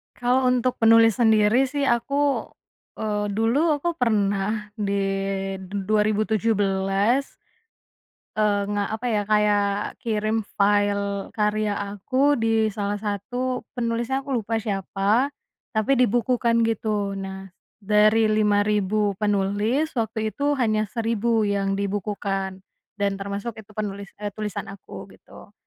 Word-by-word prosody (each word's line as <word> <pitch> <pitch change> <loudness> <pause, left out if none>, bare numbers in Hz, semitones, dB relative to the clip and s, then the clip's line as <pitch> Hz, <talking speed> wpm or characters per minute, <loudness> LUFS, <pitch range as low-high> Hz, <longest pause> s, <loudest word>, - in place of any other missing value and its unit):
Kalau 250 +2 +1
untuk 250 0 +1
penulis 225 -1 +5
sendiri 220 +2 +4
sih 280 +1 -1
aku, 280 +4 +1 0.6
eee, 210 -1 -1
dulu 285 +8 +2
aku 345 -1 -2
pernah 210 -2 0
di 200 -1 0 0.6
du 190 +1 -5
dua 215 -1 +4
ribu 215 0 +1
tujuh 220 +1 +2
belas 200 +6 +1 1.0
Eee 205 -2 +2
nga 205 0 0
apa 220 +3 -4
ya 210 - +2
kayak 210 -1 +3 0.4
kirim 220 -2 0 0.2
file 200 -1 +1
karya 210 -1 0 0.2
aku 260 +8 +1
di 225 -3 +2
salah 205 -1 -2
satu 225 +5 -3 0.2
penulisnya 240 +3 -1
aku 275 - -3
lupa 225 +2 -2
siapa, 205 +3 0 0.4
tapi 220 +4 +1
dibukukan 240 -1 +2
gitu 210 -3 -1
nah, 195 0 -6 0.3
dari 215 +1 +3
5000 210 -1 +2
penulis 205 +8 0
waktu 220 -2 -2
itu 285 0 0
hanya 215 -4 +1
1000 230 -1 0
yang 195 -1 0
dibukukan, 200 -1 -2 0.4
dan 200 -1 +1
termasuk 200 +4 -4
itu 210 - -26
penulis 200 -2 -5
e 205 -1 -5
tulisan 210 -2 -4
aku 195 0 -10
gitu, - - -16
215 Hz, 125 wpm, -24 LUFS, 200-230 Hz, 1.0 s, penulis